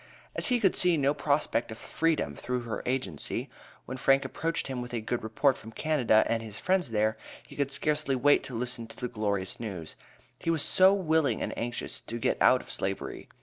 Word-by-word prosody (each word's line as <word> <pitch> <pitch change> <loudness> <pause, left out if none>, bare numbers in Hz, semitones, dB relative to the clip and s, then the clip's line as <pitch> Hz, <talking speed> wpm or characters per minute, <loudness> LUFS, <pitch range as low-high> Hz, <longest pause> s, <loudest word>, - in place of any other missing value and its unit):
As - - +2
he 250 -2 +2
could 195 -5 +3
see 180 -2 +5
no 140 0 +2
prospect 140 -5 0
of 110 - -7
freedom 155 - -1
through 125 - -3
her 115 -2 -5
agency, 125 - -3 0.3
when 130 - -6
Frank 135 +1 +3
approached 165 +1 -2
him 130 -2 -4
with 125 0 -8
a - - -1
good 115 +2 -3
report 130 +5 +1
from 110 - -11
Canada 125 -6 +2
and 115 -1 0
his 110 -2 -8
friends 185 - 0
there, 110 0 +1 0.3
he - - -14
could 140 -1 -1
scarcely 150 0 0
wait 145 +3 +4
to 125 - -7
listen 120 -1 -1
to 115 - -13
the 125 - -4
glorious 100 -5 -2
news; 95 -9 -6 0.4
he - - -3
was 165 -3 +1
so 190 +1 +5
willing 160 - +1
and - - -3
anxious 120 +1 0
to 115 - -6
get 115 - -1
out - - +5
of - - -10
slavery. 95 0 -4
125 Hz, 205 wpm, -28 LUFS, 110-150 Hz, 0.4 s, see